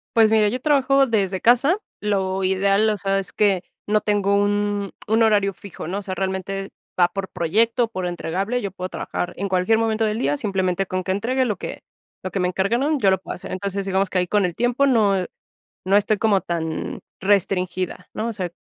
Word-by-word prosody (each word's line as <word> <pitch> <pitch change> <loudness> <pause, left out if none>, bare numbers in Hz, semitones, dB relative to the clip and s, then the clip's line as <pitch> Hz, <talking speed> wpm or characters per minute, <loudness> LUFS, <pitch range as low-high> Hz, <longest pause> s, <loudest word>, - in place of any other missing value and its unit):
Pues, 220 -1 +5
mira 215 -1 +4
yo 250 +5 -1
trabajo 275 -1 +3
desde 200 -6 0
casa, 250 - +4 0.2
lo 195 -2 0
ideal, 195 +3 +3
o 210 - 0
sea, 195 +1 0
es 190 -4 -5
que 195 -2 +2 0.3
no 210 0 +2
tengo 205 -1 +1
un 205 0 0 0.2
un 220 +2 +3
horario 205 -3 +3
fijo, 195 -4 -9
¿no? 190 +4 -2
O - - -6
sea, 190 -2 -5
realmente 190 +1 -3 0.3
va 175 -1 +5
por 195 0 -5
proyecto, 230 +8 +1
por 185 -5 -4
entregable, 190 +7 -2
yo 200 - -4
puedo 185 0 -6
trabajar 175 - -4
en 200 - -2
cualquier 185 +4 +2
momento 225 0 +1
del 215 0 -1
día, 140 +2 +1
simplemente, 190 0 -1
con 185 0 -2
que 185 - -2
entregue 245 +7 0
lo 210 -5 -1
que - - -7 0.4
lo 185 - -4
que 195 - -2
me 180 - +1
encargaron, 235 - 0
yo 195 -5 +4
lo 190 - +2
puedo - - -6
hacer. - - -9
Entonces, 195 +1 -3
digamos 195 0 0
que 185 - -2
ahí 180 0 +1
con 205 +1 +2
el 175 -2 -3
tiempo 245 +3 +2
no 215 -6 +3
e 180 - -3 0.6
no 195 +2 +3
estoy 210 +1 +2
como 205 -3 +3
tan 160 -3 -4 0.2
restringida, 185 -2 0
¿no? 225 - -2
O - - -2
sea, 185 -5 -4
200 Hz, 210 wpm, -22 LUFS, 185-220 Hz, 0.6 s, Pues